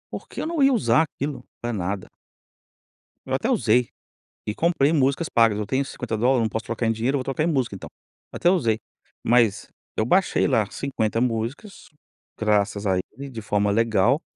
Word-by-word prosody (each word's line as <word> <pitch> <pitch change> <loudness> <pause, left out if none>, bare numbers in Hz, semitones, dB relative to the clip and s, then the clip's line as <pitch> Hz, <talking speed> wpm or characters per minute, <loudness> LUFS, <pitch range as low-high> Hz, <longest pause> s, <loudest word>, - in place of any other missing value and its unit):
Porque - - -8
eu - - -2
não 325 -2 -1
ia 275 0 +6
usar 225 -9 +3
aquilo 140 -3 -5 0.2
pra 120 0 -3
nada. 95 -1 -3 1.2
Eu 130 - -4
até 180 - 0
usei 125 - +3 0.6
e 105 - -2
comprei 160 0 +2
músicas 140 +1 +1
pagas. 115 -3 +3
Eu 105 - -2
tenho 130 +6 0
$50, 125 0 0
não 110 - 0
posso 110 +2 -4
trocar 115 0 -2
em - - +3
dinheiro, 115 +5 0
eu - - +1
vou - - -3
trocar 135 +4 -1
em - - +1
música 130 -10 0
então. 95 - -9 0.4
Até 175 - +2
usei, 120 - +2 0.5
mas 115 -4 +3 0.3
eu 110 - +1
baixei 185 +10 +2
lá 110 -6 +1
50 115 -5 -2
músicas, 125 - -3 0.5
graças 105 -1 +1
a 95 -2 +2 0.2
ele, 140 +4 -8
de 115 -4 -7
forma 105 -1 +1
legal, 115 - +2
120 Hz, 180 wpm, -24 LUFS, 110-140 Hz, 1.2 s, ia